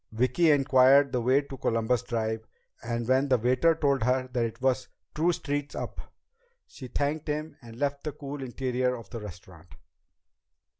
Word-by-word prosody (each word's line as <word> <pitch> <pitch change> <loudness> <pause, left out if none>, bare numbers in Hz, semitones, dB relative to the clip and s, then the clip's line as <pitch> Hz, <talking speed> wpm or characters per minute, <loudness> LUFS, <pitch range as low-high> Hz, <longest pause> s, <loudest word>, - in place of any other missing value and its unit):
Vicki 130 +9 +2
inquired 135 -1 +5
the 125 - 0
way 130 +4 +3
to 140 -1 -10
Columbus 115 +1 +1
Drive, 110 -1 -3 0.3
and 120 -1 -3
when 130 +2 +3
the 130 -2 +3
waiter 130 +8 +3
told 140 -4 +1
her 130 +2 +1
that 120 -1 +1
it 115 - -6
was 130 -1 +1 0.3
two 165 +3 +2
streets 145 -3 -3
up, - - -5 0.6
she 130 - -10
thanked 145 +4 -2
him 150 +1 -3
and 115 -2 -12
left 140 +1 -2
the 150 - -2
cool 140 0 -7
interior 125 0 -1
of 115 -5 -11
the 115 - -5
restaurant. 90 -4 -12
130 Hz, 165 wpm, -28 LUFS, 115-140 Hz, 0.6 s, inquired